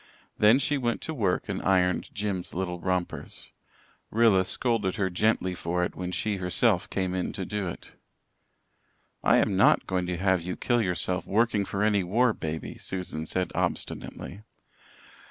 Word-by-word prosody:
Then 110 +4 +6
she 140 +1 +1
went 120 -2 0
to 160 - -4
work 100 -10 0
and - - -3
ironed 90 -1 +2
Jims's 100 -5 -3
little 90 -1 -2
rompers. 90 0 -3 0.6
Rilla 110 -5 +4
scolded 105 -1 0
her 95 -2 0
gently 95 0 +1
for 90 0 -1
it - - -2
when 90 0 -4
she 105 +2 -1
herself 90 +2 +1
came 95 -2 -1
in 90 -1 -2
to 95 - -4
do 105 -1 -3
it. 85 - -8 1.3
"I - - +5
am - - +2
not - - +4
going 90 -1 -1
to 90 -1 -2
have 95 -1 +2
you 90 +2 -4
kill 120 -1 +1
yourself 90 -1 -1
working 105 -1 +2
for 100 +2 -2
any 105 -3 +3
war 115 +6 +2
baby," 80 -3 -5
Susan 90 -4 -4
said 90 +2 -1
obstinately. 100 - -3
95 Hz, 160 wpm, -27 LUFS, 90-105 Hz, 1.3 s, Then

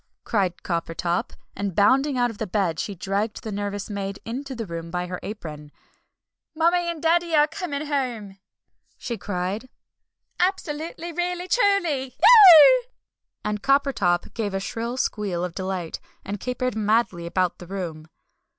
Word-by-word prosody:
cried 190 -5 -1
Coppertop. 170 0 -2 0.2
And 200 -3 -3
bounding 265 +7 +3
out 245 -1 +2
of 210 -3 -6
bed 185 -7 0
she 200 - -3
dragged 200 +4 -2
the 220 - -5
nervous 205 0 -4
maid 200 -1 -4
into 265 +4 -5
the 230 -2 -4
room 170 -2 -6
by 180 +1 -2
her 180 0 -5
apron. 150 -8 -8 0.8
"Mummie 340 +2 +2
and 335 -2 -5
Daddy 335 0 +2 0.2
coming 310 -5 -4
home!" 240 -9 -3 0.6
she 235 - -4
cried, 200 +4 -4 0.7
"absolutely 340 -2 -2
really 355 +1 -2
truly! 345 - +1
Eeeeeuggh!" 430 +3 +9 0.6
and 210 0 -2
Coppertop 275 -11 +1
gave 205 -4 -3
a - - 0
shrill 230 +5 -4
squeal 200 -8 -1
of 180 - -6
delight, 185 -3 -4 0.3
and 200 +1 -4
capered 250 0 -2
madly 210 -5 +1
about 180 0 0
the 175 - -10
room. 165 -5 -6
215 Hz, 140 wpm, -24 LUFS, 185-290 Hz, 0.8 s, Eeeeeuggh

